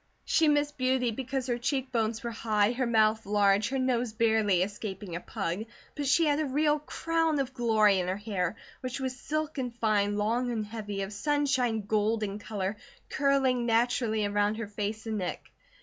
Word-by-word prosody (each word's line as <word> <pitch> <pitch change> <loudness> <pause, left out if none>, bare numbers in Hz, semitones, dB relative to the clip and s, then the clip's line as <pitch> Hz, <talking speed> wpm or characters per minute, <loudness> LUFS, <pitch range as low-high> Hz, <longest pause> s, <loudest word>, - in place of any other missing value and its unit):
She 320 - +3
missed 295 -1 +1
beauty 255 -1 +2
because 260 +2 -3
her 240 -2 -1
cheekbones 245 -4 -1
were 235 - -3
high, 215 -2 +1
her 250 0 -1
mouth 220 -1 +3
large, 205 0 +3
her 270 - -1
nose 250 -3 0
barely 220 -5 +3
escaping 195 -2 -5
a - - -2
pug; 175 +4 -3 0.3
but 290 -2 -2
she 330 +4 +4
had 295 0 +2
a 310 - +1
real 295 +2 +2
"crown 325 +1 0
of 270 -1 -2
glory" 215 -5 +3
in 180 - -2
her 185 +1 -1
hair, 205 -3 -2 0.2
which 255 +1 -4
was 260 -1 -3
silken 295 -1 -3
fine, 210 -3 +1
long 235 +4 0
and 220 -3 -2
heavy, 205 -2 -4
of 195 +2 -6
sunshine 260 -2 +1
gold 215 +1 +1
in 205 0 -3
colour, 205 -1 -3 0.3
curling 265 -4 +2
naturally 230 -2 +2
around 205 +1 +1
her 225 0 -4
face 210 +1 -4
and 220 -2 -2
neck. 180 -2 -5
230 Hz, 180 wpm, -29 LUFS, 210-260 Hz, 0.3 s, she